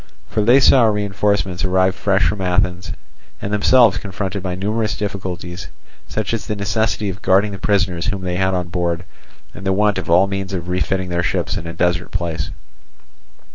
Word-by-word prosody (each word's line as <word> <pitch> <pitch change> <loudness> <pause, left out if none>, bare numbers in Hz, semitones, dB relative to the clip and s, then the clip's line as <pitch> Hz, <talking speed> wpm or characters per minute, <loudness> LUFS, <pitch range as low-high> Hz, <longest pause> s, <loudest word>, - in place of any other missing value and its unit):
For 105 - -1
they 120 +6 +6
saw 130 -2 +6
reinforcements 100 -3 0
arrived 95 0 +2
fresh 100 0 +2
from 105 -2 -2
Athens, 90 -2 0 0.5
and 100 - -4
themselves 110 0 +5
confronted 95 0 -4
by 90 -1 -3
numerous 105 +3 -1
difficulties, 95 -3 -5 0.4
such 110 0 -3
as 115 - -3
the 105 - -2
necessity 105 +1 -1
of 95 - -11
guarding 95 +3 +3
the 100 - -7
prisoners 95 -4 0
whom 100 -3 -2
they 90 -1 -2
had 95 0 +1
on 90 -2 -2
board 85 0 -2 0.5
and 95 - -10
the 95 - +1
want 105 0 +2
of 90 - -7
all 90 +3 +5
means 95 0 -4
of 90 -1 -4
refitting 90 +1 -1
their 85 0 0
ships - - -1
in 85 - -5
a 85 - -5
desert 90 +1 0
place. 85 -6 -3
95 Hz, 180 wpm, -19 LUFS, 90-105 Hz, 0.5 s, they